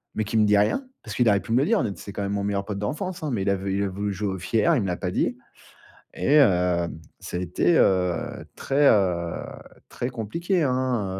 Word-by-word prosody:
mais 110 - 0
qui 110 - -5
me 105 - +5
dit 105 0 +4
rien. 105 - +2 0.2
Parce 110 -3 -7
qu'il 120 +3 +2
aurait 100 -1 +3
pu - - -8
me 120 - +4
le 140 - +2
dire 145 - +2
de 105 -4 -2
c'est 100 - -9
quand 100 0 -4
même 100 - -2
mon 100 -1 -1
meilleur 100 -1 -1
pote 100 -2 -4
d'enfance, 175 - -4
hein, 155 - -2
mais 100 -5 -1
il 100 - 0
a 100 - +2
vou 95 +1 -6
il 100 +1 0
a 100 - -1
voulu 100 +2 -3
jouer 100 0 -2
au 95 - -6
fier, 115 - +2
il 125 - +1
me 95 - -2
l'a 90 - -2
pas 90 - -3
dit 120 +5 0 0.8
et 150 +2 +4
heu, 90 -8 +3 0.3
ça 90 - -5
a - - -2
été, 90 - +1
heu, 90 -2 +1
très, 140 +1 +2
heu, 90 -5 +1 0.5
très 120 - -4
compliqué, 165 - -1
hein, 125 -5 0
105 Hz, 250 wpm, -24 LUFS, 95-125 Hz, 0.8 s, me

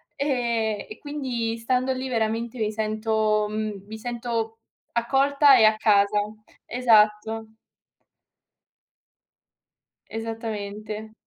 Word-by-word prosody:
e 235 -6 -1
e 425 - -9
quindi 255 -6 -3
stando 255 +2 +1
lì 260 0 -4
veramente 230 +1 -1
mi 215 -1 0
sento 215 0 0
mhmm, 210 -2 -4
mi 220 +1 -8
sento 230 -1 -3 0.4
accolta 275 +3 +4
e 220 - +7
a 215 0 +5
casa. 205 -1 +3 0.5
Esatto. 220 -2 +2 2.6
Esattamente. 215 -1 -5
225 Hz, 90 wpm, -25 LUFS, 215-245 Hz, 2.6 s, e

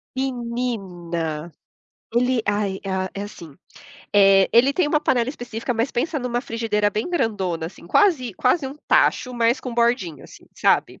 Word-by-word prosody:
Menina, 195 - -3 0.6
ele 250 0 +2
aí, 205 -2 0
ah, 190 -1 -2
é 200 - -4
assim, 170 -8 -11 0.6
eh, 195 -1 +6
ele 250 +4 +5
tem 340 +2 +1
uma 300 0 +2
panela 245 -4 +1
específica, 245 -2 -4
mas 230 +3 0
pensa 305 +6 -1
numa 245 -3 -1
frigideira 225 -4 0
bem 215 - -3
grandona, 200 - -1
assim, 170 0 -12
quase 280 - +3
quase 260 - +2
um 270 +2 -8
tacho, 250 -1 +2
mas 235 +1 +2
com 250 -2 -6
bordinha, 235 - 0
assim, - - -15
sabe. - - +1
230 Hz, 155 wpm, -22 LUFS, 195-250 Hz, 0.6 s, eh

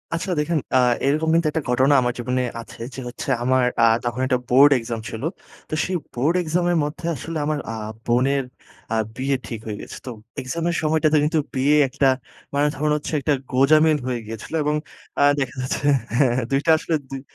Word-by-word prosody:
আচ্ছা। 175 +3 -3
দেখেন, 155 +2 +1 0.2
আ - - +5 0.3
এরকম 155 +3 +1
কিন্তু 165 -1 +3
একটা 160 0 -1
ঘটনা 130 +3 +4
আমার 125 0 0
জীবনে 125 +1 -1 0.2
আছে 115 - -12
যে - - -7
হচ্ছে 120 +3 -6
আমার 130 0 +3 0.2
আ - - +8 0.2
তখন 120 +1 -2
একটা 130 -1 +2
বোর্ড 135 +4 +7
exam 115 0 -4
ছিলো। 115 +7 -3 0.4
তো - - -7
সেই 185 - -2 0.2
বোর্ড 145 +8 +1
exam 175 +2 0
এর 175 - +2
মধ্যে 150 +3 -5
আসলে 160 +5 -5
আমার 150 0 -1
আ - - -4 0.3
বোনের 135 +3 +2 0.5
আ - - +1 0.2
বিয়ে 135 +1 0
ঠিক 115 - -5
হয়ে 105 -2 -4
গেছে। - - -9
তো 125 - -5 0.3
exam 130 +6 -4
এর 170 - -1
সময়টাতে 155 0 +2
কিন্তু 155 +1 +2 0.2
বিয়ে 140 +3 +3
একটা 135 +1 +2 0.4
মানে 145 +1 +2
ধরুন 150 +2 0
হচ্ছে 150 +1 -4
একটা 145 +2 +1 0.2
গোজামিল 155 +4 +5
হয়ে 125 -2 -1
গিয়েছিলো। 115 +8 -7
এবং 150 +1 +1 0.5
আ - - +6 0.2
দেখা 135 -2 -2
যাচ্ছে, 130 +2 -3 0.3
হ্যাঁ, 135 -4 +4
হ্যাঁ। 130 - 0
২ 135 - +3
টা 165 - +5
আসলে 160 +1 -1
দুই, 135 -1 -6
140 Hz, 200 wpm, -22 LUFS, 125-155 Hz, 0.5 s, আ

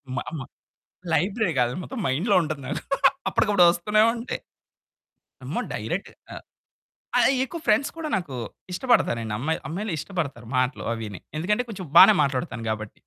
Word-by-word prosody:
మ - - -3 0.2
మ - - -5 0.7
లైబ్రరీ 185 +3 +1
కాదు. 120 0 +2
మొత్తం 255 +5 -6
మైండ్‌లో 175 - +1
ఉంటది. 155 -2 -4
నాకు 145 - -3 0.5
అప్పటికప్పుడు 200 -4 +4
వస్తూనే 210 +5 +2
ఉంటాయి. 235 +2 -5 1.0
అమ్మో! - - -3
డైరెక్ట్‌ - - -3 0.2
ఆహ్, - - -8 0.8
ఆ! - - +5 0.2
ఎక్కువ 335 +5 -7
ఫ్రెండ్స్ 220 +6 +3
కూడా 320 -2 -4
నాకు 175 -8 -5 0.4
ఇష్టపడతానండి. 180 - +1
అమ్మాయి 160 +7 -1
అమ్మాయిలు 195 +5 -3
ఇష్టపడతారు 140 - -4
మాటలు 130 +1 0
అవిని. 110 -4 -6 0.2
ఎందుకంటే 210 +9 +1
కొంచెం 190 -5 -6
బాగానే 200 +2 +9
మాట్లాడతాను 125 -4 -3
గాబట్టి. 110 -1 -4
175 Hz, 140 wpm, -25 LUFS, 130-210 Hz, 1.0 s, బాగానే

